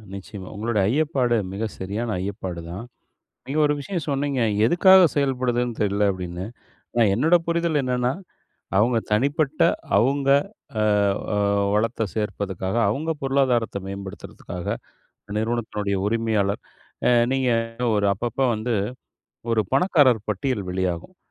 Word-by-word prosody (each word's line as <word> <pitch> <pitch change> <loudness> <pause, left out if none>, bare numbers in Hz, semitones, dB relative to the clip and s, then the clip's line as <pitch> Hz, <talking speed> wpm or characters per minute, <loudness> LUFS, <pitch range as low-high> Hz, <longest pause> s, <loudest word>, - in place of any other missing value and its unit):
நிச்சயமா. 95 0 -9
உங்களோட 110 +1 -2
ஐயப்பாடு 135 -4 +1 0.2
மிக 105 +3 -3 0.2
சரியான 105 +5 -3
ஐயப்பாடு 95 -3 -5
தான். 95 +6 -6 0.6
நீங்க 145 +3 -2
ஒரு 150 - +2
விஷயம் 170 +1 -4
சொன்னீங்க. 140 -1 -1 0.2
எதுக்காக 190 - +7
செயல்படுதுன்னு 125 -4 0
தெர்ல 100 0 +2
அப்டின்னு. 90 0 -5 0.5
நான் 110 -4 +4
என்னோட 155 - +3
புரிதல் 170 -3 +1
என்னன்னா, 125 0 0 0.7
அவங்க 115 +2 +3
தனிப்பட்ட 140 +6 +1 0.3
அவங்க. 135 +5 +2 0.7
ஆ - - +3 0.4
அ - - +1 0.4
வளத்த 110 0 0
சேர்ப்பதுக்காக, 100 -2 -3
அவங்க 150 +9 -2
பொருளாதாரத்த 130 -6 +1
மேம்படுத்துறதுக்காக, 95 -2 -7 0.7
நிறுவனத்தினுடைய 110 -3 -1
உரிமையாளர் 110 -3 0 0.5
ஆ - - +5 0.2
நீங்க 130 -2 +1 0.4
ஒரு 100 -1 +2
அப்பப்ப 120 +6 -4
வந்து 115 +3 -2 0.8
ஒரு 110 -1 +3
பணக்காரர் 135 - +4
பட்டியல் 105 0 -1
வெளியாகும். 95 - -3
115 Hz, 115 wpm, -23 LUFS, 100-135 Hz, 0.8 s, எதுக்காக